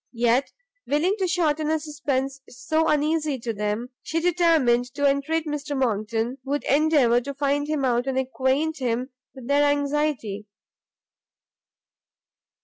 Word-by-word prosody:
Yet, 240 +3 +2 0.4
willing 310 +7 +2
to 375 - +1
shorten 310 -3 +1
a 315 0 +1
suspence 275 -3 -3
so 315 +6 -1
uneasy 300 -1 +1
to 230 -1 -4
them, 210 +3 -3
she 330 - -2
determined 320 -9 +2
to 285 -1 +2
entreat 295 +4 0
Mr 295 -1 -3
Monckton 230 +1 -1
would 285 +1 -2
endeavour 280 -5 +3
to 280 +2 -6
find 285 +1 0
him 300 -3 0
out, 245 0 +1
and 265 -1 -1
acquaint 265 +4 0
him 250 +1 -2 0.2
with 260 -3 -10
their 285 +1 +3
anxiety. 285 -7 0
280 Hz, 135 wpm, -24 LUFS, 250-305 Hz, 0.4 s, endeavour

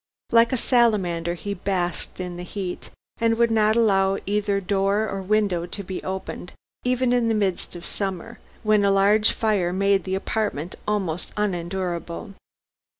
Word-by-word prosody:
Like 230 0 +5
a 260 - +1
salamander 190 -9 +2
he 200 +3 -4
basked 180 -2 -2
in 180 -1 -4
the 175 - -6
heat, 180 0 -5 0.3
and 230 0 +2
would 235 0 +3
not 215 -1 +3
allow 195 -4 +3
either 205 0 0
door 200 +2 +1
or 195 -1 -4
window 190 -3 +1
to 200 +3 -6
be 185 0 -5
opened, 190 -1 -5 0.3
even 250 0 +1
in 245 -2 +2
the 225 - +2
midst 195 -4 -1
of 170 - -8
summer, 195 +3 -4 0.2
when 215 -1 +3
a 200 - +4
large 200 +2 +4
fire 205 -6 +1
made 195 +1 +2
the 190 0 -2
apartment 190 -5 -2
almost 190 -6 -1
unendurable. 180 -1 -3
195 Hz, 155 wpm, -24 LUFS, 180-215 Hz, 0.3 s, Like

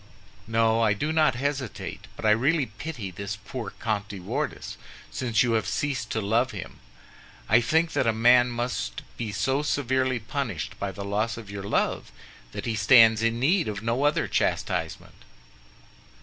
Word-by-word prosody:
"No, 115 0 +2
I 110 -3 +4
do 150 +10 -2
not 155 -5 +3
hesitate; 135 -2 -4
but - - -7
I 105 - +5
really 140 +7 +3
pity 110 -2 -7
this 100 +2 -5
poor 105 +2 -6
Comte 105 -3 -2
de 100 -2 -7
Wardes, 90 - -4 0.4
since 115 -5 +1
you 120 - +1
have 110 -1 +1
ceased 140 -4 -2
to 110 - -1
love 115 +5 +1
him. 100 -5 -8 0.7
I 110 +3 +5
think 160 +7 +2
that 130 - +1
a - - +5
man 120 +2 +5
must 120 - -3
be 115 -3 -4
so 135 +6 0
severely 130 -3 0
punished 110 - -4
by 100 -1 -2
the 100 +2 -7
loss 105 +3 -1
of 110 -3 -9
your 100 -1 -5
love - - -1 0.4
that - - -6
he 115 - -1
stands 110 +1 +6
in 115 0 +1
need 165 +6 +2
of 105 -1 -4
no 120 +4 0
other 145 - +2
chastisement." - - -2
115 Hz, 170 wpm, -26 LUFS, 105-130 Hz, 0.7 s, stands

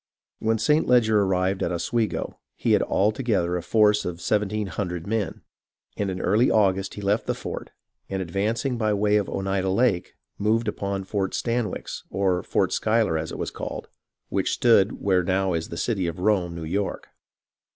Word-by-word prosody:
When 110 0 +1
St. 150 +8 +2
Leger 110 -4 +4
arrived 95 0 +1
at - - 0
Oswego, 110 +6 -2 0.2
he - - 0
had - - +5
altogether 105 -4 +1
a 90 - -1
force 105 +3 +3
of 85 -1 -4
seventeen 105 +3 0
hundred 90 -4 -4
men; 105 -3 -2 0.5
and 95 -3 -2
early 105 +7 +3
in - - +2
August 95 -2 +2
he 105 - -6
left 100 +3 +1
the - - 0
fort, - - -6 0.4
and, 95 - -2
advancing 110 +8 -1
by 110 -2 +1
the 105 - +2
way 105 +1 +3
of 100 - -1
Oneida 95 -1 -1
Lake, 95 -2 +1 0.2
moved 110 +3 +1
upon 100 -2 -2
Fort 95 0 -2
Stanwix, 120 -2 -2
or 95 -2 +1
Fort - - 0
Schuyler 110 -5 +2
as 80 0 -2
it - - -6
was - - -3
called, - - -6 0.4
which - - 0
stood 110 -4 +3
where 95 -2 +3
now 95 +1 0
is 80 0 -2
the 85 - -6
city 95 -5 0
of 85 - -4
Rome, 90 -3 +1
New 80 -1 -5
York. 95 +5 -3
100 Hz, 180 wpm, -25 LUFS, 95-110 Hz, 0.5 s, had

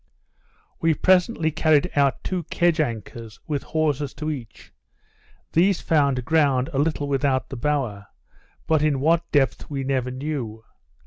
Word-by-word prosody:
We 165 -1 +2
presently 180 -2 +2
carried 155 -1 +2
out 140 -2 +2
two 185 -2 -2
kedge 170 0 +1
anchors, 115 -4 -4
with 145 -3 -2
hawsers 150 -3 -1
to 155 0 -3
each; 125 -8 -9 0.8
these 185 +3 +3
found 140 -6 +1
ground 140 -5 +2
a 135 - 0
little 145 -1 0
without 135 -1 0
the - - -6
bower, 120 -7 -2 0.6
but 160 -2 +2
in 150 -3 +1
what 165 +4 +1
depth 140 -3 +1
we 140 -2 -3
never 130 -2 -1
knew. 130 -5 -5
145 Hz, 140 wpm, -23 LUFS, 130-160 Hz, 0.8 s, these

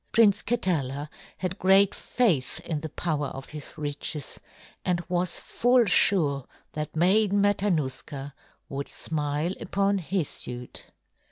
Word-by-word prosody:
Prince 210 -3 +5
Katala 150 - -1 0.3
had 185 +1 -3
great 195 +1 +5
faith 165 - 0
in 160 -3 -3
the 160 - -5
power 150 -3 -1
of 135 0 -8
his 150 -2 -8
riches 145 0 -3 0.4
and 180 -1 +1
was 180 0 0
full 245 0 +3
sure 155 - +3 0.2
that 150 0 -5
Maiden 200 +4 +4
Matanuska 155 -8 0 0.3
would 140 0 -5
smile 150 +2 -1
upon 200 0 +1
his 175 -2 -1
suit. 125 0 -6
165 Hz, 120 wpm, -27 LUFS, 145-195 Hz, 0.4 s, Prince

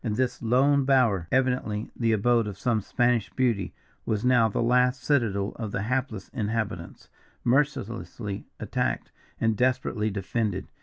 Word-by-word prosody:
"And 110 -4 -1
this 130 +1 -1
lone 135 +4 +3
bower, 120 -10 +3
evidently 125 -4 0
the 115 -2 +1
abode 115 +1 +2
of 100 -2 -6
some 115 0 0
Spanish 120 +1 +1
beauty, 115 -7 0 0.3
was 110 +2 -1
now 125 -3 +5
the - - -2
last 125 +1 +2
citadel 115 -8 +1
of 110 -3 -4
the 100 - -2
hapless 120 -3 -2
inhabitants, 105 -5 -4 0.4
mercilessly 120 -6 -1
attacked - - -2 0.3
and 110 -1 +2
desperately 125 -3 0
defended. 100 0 -2
115 Hz, 140 wpm, -26 LUFS, 105-125 Hz, 0.4 s, now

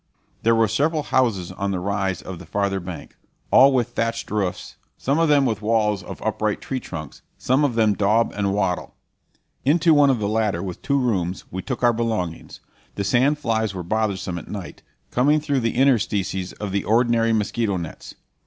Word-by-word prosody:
There 115 0 +3
were 115 0 +3
several 150 +8 0
houses 105 -12 0
on 100 +2 -3
the 95 -2 -1
rise 95 -1 -2
of 95 -3 -7
the - - -12
farther 100 -1 -1
bank, 90 -1 -8 0.4
all 135 +2 +7
with 125 -3 +1
thatched 115 -1 -2
roofs, 100 -4 -3 0.2
some 140 +4 0
of 165 -1 +3
them 145 -2 +4
with 110 -4 -1
walls 105 -2 +1
of 90 - -9
upright 110 -1 -1
tree 130 - -4
trunks, 80 - -8 0.2
some 130 +4 +1
of 135 -5 +1
them 110 -2 +3
daub 105 +3 +2
and 100 -1 0
wattle. 95 -3 -1 0.7
Into 160 +4 +4
one 145 -2 +5
of 130 - +3
the 105 -2 -2
latter, 105 -5 0
with 90 -3 -6
two 140 - +1
rooms, 95 -9 -1
we 95 - -4
took 130 +2 -5
our 120 -1 +5
belongings. 110 -8 -3 0.3
The 100 - -2
sand 130 +9 +2
flies 110 -7 -1
were 90 - -4
bothersome 95 -2 -1
at - - -12
night, 100 -4 -7 0.3
coming 145 +5 +3
through 145 -2 0
the 115 -2 -1
interstices 105 -8 +1
in 105 -2 -5
the 100 +1 -1
ordinary 115 0 +2
mosquito 110 -1 0
nets. 85 -2 -8
110 Hz, 190 wpm, -22 LUFS, 95-125 Hz, 0.7 s, all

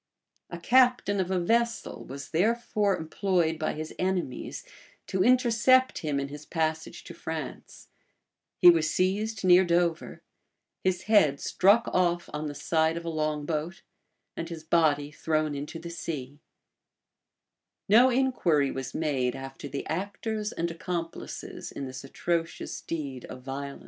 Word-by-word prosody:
A 175 - -6
captain 245 0 +3
of 185 -1 0
a 190 -1 +1
vessel 235 +6 0
was 140 +1 -8
therefore 210 +1 +1
employed 165 -1 0
by 155 - -1
his 155 +1 -6
enemies 180 -8 -2 0.4
to 185 -1 0
intercept 255 +1 +4
him 150 -3 -1
in 140 - -2
his 145 +1 -9
passage 160 -1 -2
to - - -10
France: - - -7 0.7
he 175 - +9
was 160 -2 +1
seized 200 +5 0
near 180 0 +7
Dover; 170 -1 0 0.6
his 185 -1 0
head 155 -11 +4
struck 205 +5 +3
off 175 -1 +1
on 150 +1 -3
the 145 - -6
side 160 +2 +1
of 170 - -6
a - - -2
long 155 -2 -1
boat; 160 +3 -3 0.5
and 165 - -5
his 165 -2 -7
body 150 -3 +2
thrown 155 0 -1
into 145 +3 -5
the 170 +1 -8
sea,[] 145 -5 -6 1.5
No 235 +6 +7
inquiry 215 - +2
was 135 -1 -5
made 135 -6 0
after 135 +1 -8
the 140 0 -5
actors 205 +5 -3
and 170 0 -2
accomplices 165 0 -5
in 140 - -5
this 130 0 -7
atrocious 165 +4 -3
deed 140 -6 -5
of 130 0 -10
violence. 140 +1 -6
165 Hz, 145 wpm, -28 LUFS, 150-190 Hz, 1.5 s, he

